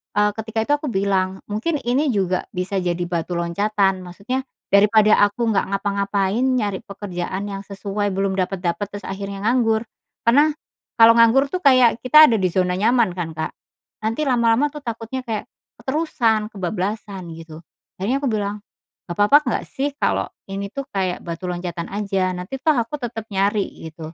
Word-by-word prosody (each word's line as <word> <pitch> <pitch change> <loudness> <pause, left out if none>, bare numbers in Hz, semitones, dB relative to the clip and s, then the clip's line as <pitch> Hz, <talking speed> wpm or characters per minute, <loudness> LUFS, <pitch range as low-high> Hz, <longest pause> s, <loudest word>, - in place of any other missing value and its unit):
eee, 210 0 +3
ketika 220 0 -3
itu 255 - -3
aku 295 - -5
bilang 190 -3 0
mungkin 225 +11 -1
ini 255 +6 +1
juga 190 -7 0
bisa 185 +2 -1
jadi 175 -1 -1
batu 175 0 -3
loncatan, 195 +3 +1
maksudnya 200 +9 -5 0.2
daripada 210 +1 +5
aku 225 +2 -1
nggak 200 - +1
ngapa-ngapain 200 +2 0
nyari 210 -7 0
pekerjaan 195 -1 -5
yang 195 - -4
sesuai 200 +1 -3
belum 195 0 0
dapat-dapat 185 +1 -1
terus 205 -1 -9
akhirnya 195 0 -5
nganggur. 225 -1 +2 0.4
Karena, 280 +6 +5 0.5
kalo 230 0 +8
nganggur 235 +4 +4
tuh 365 - -1
kayak 255 -7 +5
kita 280 +6 +7
ada 225 - +2
di 185 - +2
zona 180 0 0
nyaman 230 -1 +3
kan 170 -3 -5
Kak, 160 - -3 0.5
nanti 225 +7 -1
lama-lama 250 +1 +2
tuh 300 - -8
takutnya 235 0 -5
kayak, 215 -2 -2 0.4
keterusan, 245 -6 +1
kebablasan 190 -1 -4
gitu, 160 -1 -10 0.4
akhirnya 245 +9 -1
aku 275 - 0
bilang, 205 -1 -2 0.5
"Gak 175 - -5
papa 210 +9 +6
nggak 250 -6 -2
sih 275 +2 -2
kalo - - 0 0.2
ini 195 +1 -5
tuh 275 +6 -5
kayak 185 -2 -2
batu 170 +1 -5
loncatan 175 -1 -4
aja? 195 -3 -1
Nanti 215 +9 -6
toh 310 -3 +3
aku 240 +5 -2
tetap 225 -2 -5
nyari," 200 +1 +1 0.2
gitu, 160 0 -10
205 Hz, 165 wpm, -21 LUFS, 190-235 Hz, 0.5 s, kalo